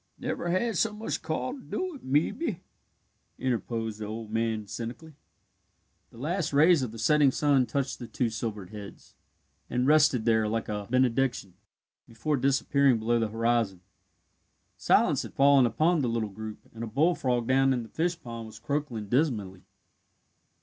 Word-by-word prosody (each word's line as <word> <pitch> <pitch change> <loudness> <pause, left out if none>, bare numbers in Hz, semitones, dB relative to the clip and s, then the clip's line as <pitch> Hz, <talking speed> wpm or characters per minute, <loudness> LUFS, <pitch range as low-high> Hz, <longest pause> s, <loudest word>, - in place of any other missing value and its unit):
"Never 175 - -3
had 205 +4 0
so 225 +3 +1
much 215 +1 -4
call 160 +10 -3
to 280 - -9
do 370 +7 -4
it, 275 - -12
mebbe," 175 - 0 0.8
interposed 115 -3 -2
the 110 - -4
old 110 0 -6
man 110 -1 -1
cynically. 120 +9 -7 1.0
The - - -17
last 165 +7 -2
rays 155 +2 +5
of 125 -4 -3
the 115 - -9
setting 145 +5 +4
sun 135 -2 +2
touched 135 +3 -2
the 120 - -7
two 115 +1 -1
silvered 110 -4 -5
heads, 105 -2 -10 0.6
and 125 +1 0
rested 150 -5 +4
there 110 -2 +3
like 115 +1 -2
a 105 -1 -4
benediction, 125 -5 +1 0.5
before 115 +7 -2
disappearing 140 -1 +3
below 115 +2 +1
the 115 - +1
horizon. 115 -4 0 0.9
Silence - - +3
had - - -9
fallen 140 -2 +5
upon 160 +7 +2
the 125 - 0
little 115 -2 -1
group, 110 +2 -8
and 115 0 -7
a - - -3
bullfrog 130 -2 +1
down 135 +2 +3
in 125 -2 0
the 110 - -12
fishpond 120 -8 -3
was 110 - -11
croaking 140 -8 -3
dismally. 105 - -1
125 Hz, 155 wpm, -28 LUFS, 110-150 Hz, 1.0 s, rays